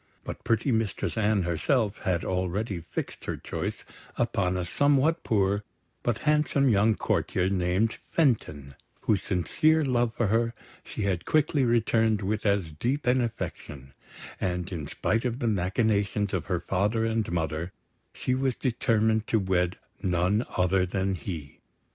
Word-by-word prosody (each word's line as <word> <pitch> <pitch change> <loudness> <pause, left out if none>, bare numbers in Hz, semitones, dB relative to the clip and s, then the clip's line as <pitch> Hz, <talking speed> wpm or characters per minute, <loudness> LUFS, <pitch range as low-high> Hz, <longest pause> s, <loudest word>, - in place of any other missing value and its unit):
But - - -7
pretty 115 +4 +1
Mistress 110 -3 -1
Anne 105 -3 +2
herself 100 - 0
had 90 -2 -1
already 95 +2 -1
fixed - - -5
her - - -3
choice - - -5 0.3
upon 100 -6 +1
a 90 - -2
somewhat 145 - +2
poor, 100 -1 +1 0.4
but 120 -3 0
handsome 150 -2 +3
young 110 0 +4
courtier 95 -2 0
named 95 +4 +1
Fenton, 80 - 0 0.3
whose 105 -4 +1
sincere 155 - +2
love 120 -3 +1
for 120 - +1
her 115 +3 +1 0.3
she 110 - -5
had 95 -4 -1
quickly 150 -2 +2
returned 115 -2 +2
with 105 +2 -1
as 100 -5 +1
deep 125 - -1
an 125 +1 +3
affection; 70 - -5 0.5
and, 90 +1 -2
in 80 -6 -4
spite 110 +1 0
of 120 -2 -1
the 125 -3 -1
machinations 100 +1 +1
of 95 - -2
her 90 -3 -1
father 105 +6 0
and 110 -4 -1
mother, 80 0 -2 0.4
she 125 - -2
was 130 -1 0
determined 110 -3 +1
to 115 - +2
wed 90 -3 0 0.2
none 90 +5 +1
other 90 +1 +3
than 95 +1 -1
he. 80 -7 -6
105 Hz, 150 wpm, -27 LUFS, 90-115 Hz, 0.5 s, young